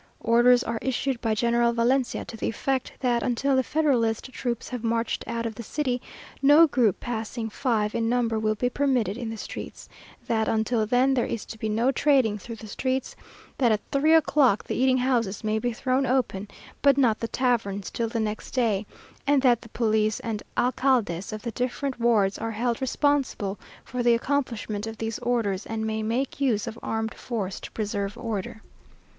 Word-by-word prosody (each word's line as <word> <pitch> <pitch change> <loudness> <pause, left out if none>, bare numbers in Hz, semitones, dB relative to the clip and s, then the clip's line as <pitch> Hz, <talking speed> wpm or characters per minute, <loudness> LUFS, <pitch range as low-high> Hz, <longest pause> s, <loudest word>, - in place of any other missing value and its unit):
Orders 240 +2 +5
are 230 0 -3
issued 265 -1 -1
by 225 -2 +1
General 235 +1 +2
Valencia 245 +2 +1
to - - -8
the 220 - -3
effect, 265 +3 -1
that 240 -2 +2
until 265 +3 +1
the 260 - +4
Federalist 260 -5 +1
troops 240 -2 -3
have 250 -2 -5
marched 230 0 -1
out 230 0 -3
of 225 - -2
the 235 - -8
city, 250 +1 -2 0.4
no 290 +4 +7
group 245 - +2
passing 225 -1 -4
five 215 -4 0
in 230 -1 0
number 235 -2 +1
will 215 0 +1
be 245 +4 0
permitted 250 -6 +1
in 240 -1 -4
the 225 - -5
streets; - - -8 0.4
that 220 -1 0
until 220 0 +1
then, 255 +4 +3
there 250 -3 +1
is 230 - -4
to - - -8
be 220 - -2
no 230 +5 +2
trading 265 -8 +2
through 230 +4 -8
the 220 - -11
streets; 260 +4 -2 0.4
that 245 -4 +4
at 215 - +2
three 305 +3 +4
o'clock 280 -8 +4
the - - -4
eating 255 0 +3
houses 240 -6 0
may 215 0 0
be 245 +2 -1
thrown 255 +3 0
open, 235 -6 0 0.3
but 280 -1 +5
not 235 -6 +3
the 230 - -2
taverns 225 -6 -1
till 230 - -1
the 230 +1 -3
next 215 +2 -4
day; 220 -5 +1 0.4
and 280 -1 +3
that 245 -3 +4
the 230 - -13
police 215 -2 +1
and 220 -2 -3 0.2
alcaldes 245 -8 +1
of 215 0 -6
the 235 - -3
different 250 +3 -3
wards 215 -5 +2
are 225 - -2
held 235 +3 -1
responsible 265 -7 0 0.2
for 250 0 -4
the 240 -1 +5
accomplishment 230 -5 -2
of 225 0 -6
these 225 0 -3
orders, 230 -5 0
and 220 -1 -3
may 220 0 -1
make 245 +6 -2
use 230 -7 +2
of 230 0 -7
armed 220 0 -2
force 205 -6 -4
to - - -8
preserve 205 -2 -3
order. 220 -2 -4
235 Hz, 190 wpm, -26 LUFS, 220-255 Hz, 0.4 s, no